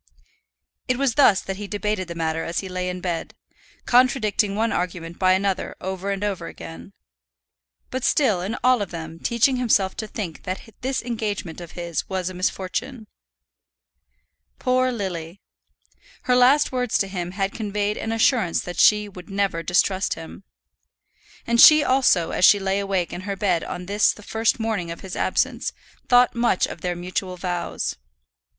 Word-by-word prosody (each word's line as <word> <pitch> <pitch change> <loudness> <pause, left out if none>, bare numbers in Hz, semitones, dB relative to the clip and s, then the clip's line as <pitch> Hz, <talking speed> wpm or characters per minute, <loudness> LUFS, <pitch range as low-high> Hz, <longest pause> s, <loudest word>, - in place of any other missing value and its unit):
It 255 - +1
was 270 -3 +1
thus 225 -7 +5
that 195 0 -5
he 205 0 -6
debated 205 -2 -2
the 170 - -7
matter 165 -1 -1
as 170 - -2
he 195 - -7
lay 180 0 -3
in 180 0 -5
bed, 175 -2 -4 0.5
contradicting 230 -5 +3
one 225 +2 +1
argument 170 -1 -3
by 185 -1 +4
another 190 0 -1
over 190 +1 -4
and 200 0 -2
over 190 -5 -2
again; 165 +4 -10 1.0
but 260 -1 -3
still 220 -11 +2
in 195 +5 -3
all 250 -2 +4
of 200 - -3
them 165 -1 -7
teaching 235 +5 +2
himself 205 -6 +2
to 215 - -4
think 195 -6 -6
that 185 +1 -4 0.2
this 260 0 -2
engagement 210 -8 -4
of 170 - -10
his 170 -3 -4
was 185 -1 -2
a - - -10
misfortune. 205 +7 -3 1.5
Poor 255 0 +1
Lily! 185 -5 -5 0.8
Her 250 - +2
last 260 +4 +5
words 250 -3 0
to 195 - 0
him 180 -2 -5
had 195 0 -1
conveyed 210 -1 -2
an 225 - -3
assurance 225 -5 +2
that 180 - -6
she 210 0 +5
would 185 -2 -12
never 195 -4 -1
distrust 185 +2 +1
him. 165 +4 -10 1.0
And 235 0 +4
she 305 -1 +9
also, 255 - +3
as - - -2
she 205 - +8
lay 195 0 -1
wakeful 190 -4 -1
in - - -7
her 200 +1 -4
bed 190 -5 0
on 180 - -6
this 205 +3 +2
the 210 - -14
first 225 +2 0
morning 220 -6 -2
of 170 - -7
his 190 -1 -7
absence, - - 0 0.4
thought 245 0 +5
much 235 -5 +2
of 165 - -8
their 180 -1 -2
mutual 180 +1 -4
vows. 175 -1 -3
195 Hz, 170 wpm, -23 LUFS, 180-225 Hz, 1.5 s, she